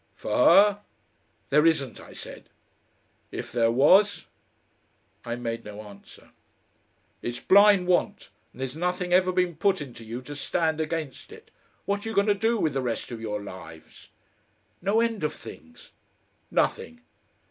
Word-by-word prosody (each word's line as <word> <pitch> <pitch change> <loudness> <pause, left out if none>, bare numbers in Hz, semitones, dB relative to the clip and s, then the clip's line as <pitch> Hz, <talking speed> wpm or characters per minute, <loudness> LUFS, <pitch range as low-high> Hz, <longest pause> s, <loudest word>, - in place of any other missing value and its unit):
"For - - -4
her?" 205 0 +6 0.7
"There 150 +2 +5
isn't," 140 -7 0
I - - -13
said. - - -10 0.8
"If - - -6
there 115 -2 +2
was?" 185 - +4 1.0
I 120 0 -4
made 115 -1 -4
no 105 0 -9
answer. 100 -1 -15 0.9
"It's 120 0 -4
blind 200 -1 +5
Want. 180 -1 0 0.2
And - - -12
there's 130 +1 -4
nothing 180 +1 -2
ever 185 0 +4
been 180 -2 0
put 195 +5 +1
into 130 -5 -9
you 115 +3 -7
to 145 +3 -8
stand 160 +2 -1
against 155 - -5
it. 445 0 -14 0.3
What 200 0 -1
are 225 - -4
you 225 - -5
going 200 - +4
to 210 - +3
do 225 +3 0
with 160 -7 0
the 135 - -1
rest 120 0 -3
of 115 -2 -6
your 105 -2 -4
lives?" 85 -5 -12 0.7
"No 200 +5 +2
end 230 -6 -1
of 150 - -1
things." 245 0 -13 0.6
"Nothing." 245 0 -1
160 Hz, 155 wpm, -26 LUFS, 120-200 Hz, 1.0 s, her